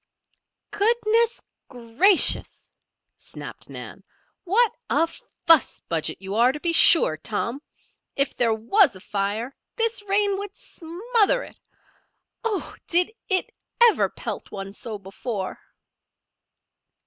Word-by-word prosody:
"Goodness, 455 +2 +1 0.3
gracious!" 255 - +3 0.5
snapped - - -11
Nan. - - -9 0.4
"What 435 +5 +2 0.2
a 330 - +2 0.4
fuss 325 -4 +4
budget 165 -2 -2
you 195 +1 -7
are 235 +4 +3
to 300 - -8
be 335 +2 -1
sure, 320 - +6
Tom. 230 - -4 0.5
If 275 0 -1
there 235 -2 +1
was 270 - +2
a - - -11
fire, 205 +6 -4 0.2
this 455 -1 -1
rain 400 0 +1
would 405 0 -8
smother 440 +8 -1
it. - - -15 0.8
Oh! 430 -4 -3
Did 355 +4 +2 0.2
it 375 -2 0 0.3
ever 470 -2 +4
pelt - - -7
one 195 0 -8
so 220 0 -8
before?" 195 +1 -6
330 Hz, 115 wpm, -23 LUFS, -, 0.8 s, sure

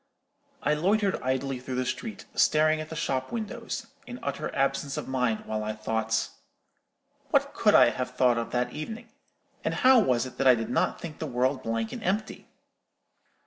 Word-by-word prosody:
I 150 - +3
loitered 195 +5 +1
idly 130 0 -1
through 130 0 -5
the 130 0 0
street, 220 - -5
staring 155 0 +3
at 155 - -8
the 160 - -6
shop 130 -5 -2
windows, 230 0 -4 0.2
in 245 - -7
utter 140 - -3
absence 140 0 0
of - - -4
mind 125 -4 0
while 110 0 -2
I 110 0 -2
thought— 110 +1 -1 1.0
"What - - +2
could - - +4
I - - +7
have 125 0 -4
thought 125 -2 +3
of 115 - -4
that 125 0 -1
evening? 225 +9 -6 0.5
and - - -1
how 260 -1 +6
was 125 - +2
it 130 - -10
that 135 - +3
I 130 - +8
did 115 0 -4
not 125 - +1
think 160 -3 -8
the 160 - -3
world 130 +1 0
blank 115 -1 -2
and - - -6
empty? 200 +4 -2
130 Hz, 185 wpm, -27 LUFS, 125-160 Hz, 1.0 s, I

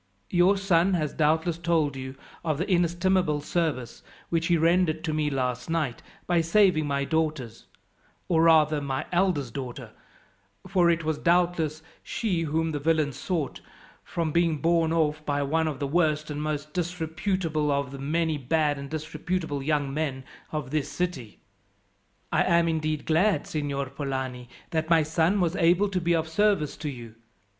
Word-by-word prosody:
Your 185 +3 +4
son 190 -1 +2
has 155 -4 -1
doubtless 160 +2 +1
told 165 -5 +1
you 130 0 -6 0.3
of 155 -3 0
the 175 - -2
inestimable 175 -2 +2
service, 150 -5 -2 0.3
which 165 -1 0
he 170 - +3
rendered 165 -1 +2
to 160 -2 -2
me 155 -1 0
last 125 -2 -2
night, 155 -7 -1 0.2
by 175 -1 +2
saving 165 -2 +3
my 140 -1 0
daughters, 150 -7 -2 0.6
or 165 -2 +3
rather 155 -2 +4
my 135 -2 -3
eldest 175 - +1
daughter 130 -3 -6 0.7
for 180 -2 +3
it 165 -1 +1
was 155 -1 -1
doubtless 170 -3 +1 0.2
she 195 -8 -2
whom 160 +1 0
the 150 - -2
villains 155 -2 +1
sought 155 -2 -3 0.4
from 165 -2 -2
being 170 -1 +2
borne 165 +1 +2
off 155 -2 +1
by 145 -1 -1
one 160 +3 +1
of 150 -3 -3
the 140 - -2
worst 155 0 +1
and 150 0 -4
most 150 -1 -3
disreputable 170 -2 -1
of 140 -2 -1
the 140 - -8
many 155 +2 0
bad 145 +1 +1
and 140 0 -7
disreputable 155 0 -3
young 145 -1 0
men 140 -3 -2 0.3
of 150 -4 -4
this 150 -2 -1
city." 150 - -4 0.9
"I - - +3
am 170 0 +3
indeed 155 -2 -1
glad, 180 +6 +2
Signor 145 -2 -2
Polani, 130 -3 -4 0.2
that 160 -1 -1
my 165 -2 +5
son 165 +5 +1
was 175 -1 +1
able 180 +4 +3
to 185 -2 -1
be 170 0 +2
of 160 -1 -1
service 160 -4 +1
to 150 0 -4
you. 120 -4 -9
160 Hz, 165 wpm, -26 LUFS, 145-170 Hz, 0.9 s, my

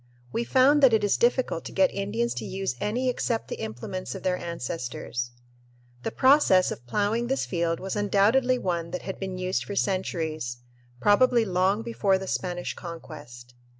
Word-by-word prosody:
We 235 - -1
found 275 +4 +4
that 265 -4 +7
it 220 - +3
is 205 - +3
difficult 245 -7 +1
to - - -6
get 190 -1 +3
Indians 115 +4 -1
to - - -6
use 190 - -3
any 245 +5 -1
except 240 -2 -1
the - - -4
implements 120 - -5
of 190 - -8
their 185 -1 +1
ancestors. 125 -7 -4 0.7
The - - -2
process 260 -9 +4
of 120 +1 -8
"ploughing" 210 - 0
this 270 +2 0
field 170 -2 -1
was 190 +2 -4
undoubtedly 210 +6 +3
one 170 -6 -2
that 180 +1 -5
had 190 - -6
been 190 -1 -4
used 185 +1 -1
for 200 - -6
centuries, 160 -10 -2 0.4
probably 235 - +4
long 190 +3 +1
before 205 -4 +1
the 190 - -6
Spanish 180 -2 -3
Conquest. 135 -8 -10
190 Hz, 170 wpm, -26 LUFS, 165-225 Hz, 0.7 s, that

